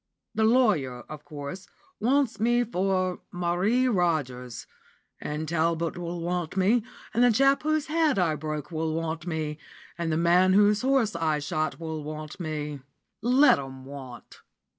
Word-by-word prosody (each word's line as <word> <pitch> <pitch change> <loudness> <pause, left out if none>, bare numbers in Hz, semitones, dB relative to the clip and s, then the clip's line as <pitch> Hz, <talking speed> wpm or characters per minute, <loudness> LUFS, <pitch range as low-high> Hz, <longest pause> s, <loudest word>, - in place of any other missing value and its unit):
The 220 - +2
lawyer, 200 - +2
of 150 +2 -10
course, 145 +5 -7 0.3
wants 260 +1 +1
me 240 +2 +3
for 185 -4 0
Marie 180 +9 +1
Rogers; 145 - -1 0.5
and 150 +1 -4
Talbot 165 0 0
will 175 0 -5
want 175 0 -3
me; 210 +5 +3 0.3
and 240 - +3
the 245 - +6
chap 275 +5 +4
whose 310 -1 0
head 315 -4 +2
I 175 -4 +2
broke 155 0 -5
will 160 -1 -2
want 165 +1 -3
me; 155 -2 -3 0.4
and 165 -1 -1
the 155 - +1
man 175 +3 +4
whose 205 +1 +4
horse 255 -5 +2
I 160 -2 +1
shot 155 +2 -2
will 160 -2 -5
want 155 +2 -7
me. 150 -3 -4 0.4
Let 255 - +5
'em 130 -1 -8
want!" 130 -3 -10
170 Hz, 150 wpm, -27 LUFS, 155-215 Hz, 0.5 s, the